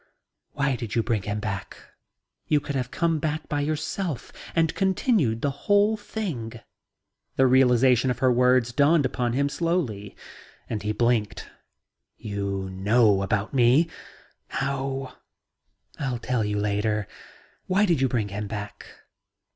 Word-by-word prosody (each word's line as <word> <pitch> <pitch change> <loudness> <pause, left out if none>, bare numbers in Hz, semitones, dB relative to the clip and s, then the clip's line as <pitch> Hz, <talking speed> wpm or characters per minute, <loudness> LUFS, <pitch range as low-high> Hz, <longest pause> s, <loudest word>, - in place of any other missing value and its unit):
"Why 140 -2 0
did 115 -3 -5
you 115 - +2
bring 115 -4 0
him 105 +2 -3
back? 100 -4 -5 0.7
You 150 - +3
could 145 - -5
have 125 -2 -2
come 165 +1 0
back 155 +1 -3
by 145 -1 -1
yourself 155 - -3 0.2
and 165 -2 +2
continued 190 - +1
the 140 - +1 0.2
whole 205 +2 +5
thing." 165 - -5 0.8
The 135 - +4
realization 130 -1 +4
of 125 - -1
her 130 0 +3
words 125 -1 +3
dawned 145 +2 +4
upon 120 -2 -1
him 140 +3 +1
slowly 140 - -2 0.5
and 110 -3 -3
he 105 - -2
blinked. 110 -3 0 0.7
"You 100 -2 -3
know 100 +1 +3
about 100 +3 -1
me? 130 +6 +4 0.6
How..." 135 -1 -3 0.8
"I'll 130 -4 -2
tell 125 -1 -1
you 105 0 -1
later. 105 0 0 0.6
Why 195 +3 +3
did 170 -8 +1
you 135 - +4
bring 110 -5 -1
him 105 +1 -4
back?" 105 -1 -7
125 Hz, 140 wpm, -25 LUFS, 105-145 Hz, 0.8 s, whole